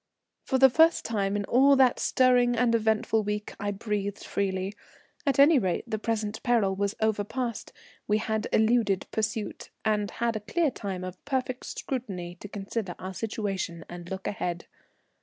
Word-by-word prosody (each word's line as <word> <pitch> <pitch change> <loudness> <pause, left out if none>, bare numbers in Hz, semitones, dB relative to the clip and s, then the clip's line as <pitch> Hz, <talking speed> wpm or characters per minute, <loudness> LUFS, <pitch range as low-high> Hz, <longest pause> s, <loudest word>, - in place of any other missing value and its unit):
For 265 - 0
the 265 0 +7
first 320 +5 +4
time 200 -3 0
in 205 -1 -1
all 275 +5 +5
that 260 -2 +4
stirring 250 -2 +3
and 235 0 +2
eventful 220 0 +2
week 210 0 -3
I 205 - -2
breathed 205 -1 -3
freely. 190 0 -2 0.5
At 275 - +2
any 285 +1 +7
rate 185 -6 -1
the 220 -2 -3
present 220 -1 -2
peril 225 -6 +2
was 200 +1 -1
overpast, 220 +2 -1 0.4
we 210 - +3
had 220 0 -1
eluded 220 -4 +2
pursuit, 215 0 -3 0.2
and 210 -2 +1
had 235 0 -1
a - - -1
clear 300 - 0
time 195 -6 -5
of 185 0 -8
perfect 260 -2 -2
security 195 -10 -4
to - - -8
consider 200 -1 -4
our 185 +1 -6
situation 195 -5 -3
and 175 0 -9
look 190 0 -5
ahead. 175 -5 -3
215 Hz, 160 wpm, -28 LUFS, 195-240 Hz, 0.5 s, the